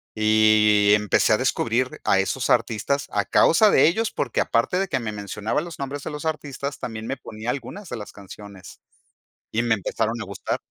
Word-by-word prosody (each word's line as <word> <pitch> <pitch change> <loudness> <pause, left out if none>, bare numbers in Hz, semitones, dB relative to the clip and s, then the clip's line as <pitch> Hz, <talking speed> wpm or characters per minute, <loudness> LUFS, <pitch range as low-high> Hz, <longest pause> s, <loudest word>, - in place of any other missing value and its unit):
Y 110 -1 +4
empecé 105 +1 +2
a - - +4
descubrir 125 -1 -1
a 95 - +3
esos 120 +7 -1
artistas 120 +4 0
a 100 -1 0
causa 205 - +4
de - - +5
ellos 220 +6 0
porque, - - -1
aparte 125 +10 0
de 195 - 0
que 135 - 0
me 110 -3 -4
mencionaba 105 +5 -3
los 170 +1 -9
nombres 140 +1 -5
de - - -5
los 150 +1 -7
artistas, 145 -2 -4
también 110 -1 -6
me 135 - -3
ponía 110 -1 -7
algunas 140 - -7
de - - -4
las 105 - -8
canciones, 100 -1 -12 0.7
y 115 +2 0
me 120 -2 +2
empezaron 110 +3 -2
a - - -5
gustar. 100 0 -4
115 Hz, 190 wpm, -23 LUFS, 105-140 Hz, 0.7 s, de